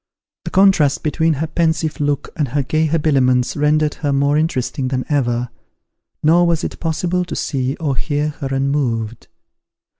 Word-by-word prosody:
The - - -3
contrast 185 -7 +3
between 160 +1 +1
her 150 +2 -2
pensive 160 0 -1
look 145 -2 -1
and 150 -4 0
her 140 +3 -1
gay 155 +4 +1
habiliments 135 -6 +2
rendered 150 0 +2
her 145 -2 0
more 140 +1 +2
interesting 140 -3 -1
than 130 -1 -2
ever, 125 -4 0 0.7
nor 170 +3 +4
was 170 -1 0
it - - -5
possible 175 +2 -1
to 175 - -6
see 130 0 -2
or 150 -5 -2
hear 145 +3 -1
her 145 -2 -6
unmoved. 135 -5 -1
145 Hz, 155 wpm, -18 LUFS, 135-160 Hz, 0.7 s, nor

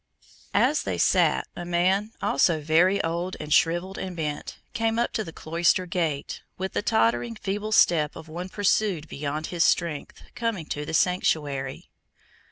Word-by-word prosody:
As - - +3
they - - -3
sat, - - +3
a 175 - -5
man, 185 +5 +1
also 160 +3 +3
very 165 +6 +3
old 170 +3 -2
and 150 0 -2
shrivelled 175 +3 +2
and 185 -2 -5
bent, 150 -2 -4 0.2
came 225 0 0
up 240 +1 0
to 225 -2 -1
the 165 - -8
cloister 170 +3 +1
gate, 165 -5 -2 0.2
with 190 +1 -4
the - - 0
tottering, 120 - +1
feeble 205 - -3
step 155 -8 +4
of 160 - -10
one 175 +4 -6
pursued 195 -5 +1
beyond 150 +2 -4
his 170 -1 +3
strength, 165 -5 0
coming 230 -8 -2
to 150 -1 -4
take 160 - -3
sanctuary. 145 -7 0
170 Hz, 160 wpm, -26 LUFS, 155-190 Hz, 0.2 s, step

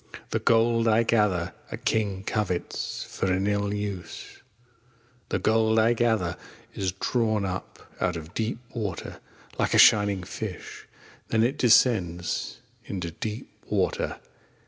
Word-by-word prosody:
The - - +1
Gold 115 0 +3
I 110 +1 +4
gather 100 -7 +1 0.2
A - - -4
King 100 -3 -1
covets 100 -5 -2
For 95 - -2
an 95 +1 +1
ill 100 0 0
use. 105 -3 -6 0.9
The - - +1
Gold 110 0 +2
I 110 +2 +5
gather 110 -8 +1 0.4
Is 95 -2 -2
drawn 110 +1 0
up 95 0 -6
Out 90 -1 +1
of 80 +2 -8
deep 110 +1 -2 0.2
Water. 105 -7 -4 0.4
Like - - +1
a - - +5
shining 100 -3 +6
Fish - - -7 0.4
Then 110 0 +2
it 125 +5 +1
descends 100 -8 +2 0.2
Into 90 -4 -4
deep 105 +6 -6 0.2
Water. - - 0
105 Hz, 130 wpm, -26 LUFS, 95-115 Hz, 0.9 s, shining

